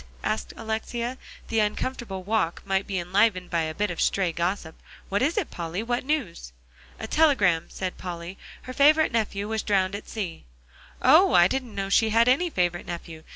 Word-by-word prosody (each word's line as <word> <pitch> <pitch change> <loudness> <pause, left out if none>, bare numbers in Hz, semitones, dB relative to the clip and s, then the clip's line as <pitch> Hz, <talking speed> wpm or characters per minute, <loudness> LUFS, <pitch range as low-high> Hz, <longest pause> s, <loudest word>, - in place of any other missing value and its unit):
asked - - -2
Alexia; 235 +3 -3 0.3
the 225 - +1
uncomfortable 210 -2 -2
walk 200 -4 -1
might 195 0 0
be 195 - -2
enlivened 185 +1 +1
by 170 -1 +1
a 155 0 -3
bit 210 +1 -1
of 175 - -4
stray 190 -3 +1
gossip; 170 -1 -2 0.3
"what 200 +3 0
is 300 +8 +1
it, 400 - -1
Polly? 170 +4 -4
What 240 +1 -1
news?" 235 - -3 0.5
"A - - -4
telegram," 210 - +3
said 185 -1 -5
Polly. 175 +1 -7 0.2
"Her 255 - -7
favorite 305 +4 +5
nephew 210 -3 -1
was 220 0 -1
drowned 195 -2 +1
at 205 - -7
sea." 190 - -5 0.6
"Oh! - - +6
I 175 0 +7
didn't 255 0 -4
know 195 0 -3
she 220 +2 +3
had 230 +2 +4
any 285 +8 +3
favorite 175 - -1
nephew. 170 -2 -7
200 Hz, 180 wpm, -25 LUFS, 175-235 Hz, 0.6 s, I